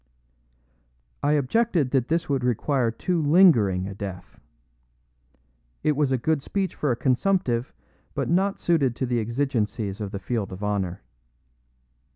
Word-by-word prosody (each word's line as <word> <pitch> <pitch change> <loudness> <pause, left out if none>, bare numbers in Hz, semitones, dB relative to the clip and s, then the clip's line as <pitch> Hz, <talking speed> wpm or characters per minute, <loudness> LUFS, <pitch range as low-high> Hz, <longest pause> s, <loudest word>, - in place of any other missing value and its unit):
I 145 - +2
objected 150 - +1
that 130 -3 +1
this 165 +1 0
would 135 -3 0
require 125 +1 +1
too 170 +9 -1
lingering 145 - +4
a 100 - -6
death; 95 -2 -8 1.4
it 150 -1 +2
was 145 -2 +1
a 130 - +2
good 150 +4 0
speech 195 +5 -2
for 150 - -2
a - - +1
consumptive, 130 0 0 0.4
but - - -1
not 195 +4 +1
suited 140 -8 +1
to 130 - -2
the 120 -1 0
exigencies 115 -4 -2
of 105 - -3
the 100 - -5
field 100 0 -3
of 95 +2 -7
honor. 95 -4 -2
130 Hz, 145 wpm, -25 LUFS, 110-155 Hz, 1.4 s, lingering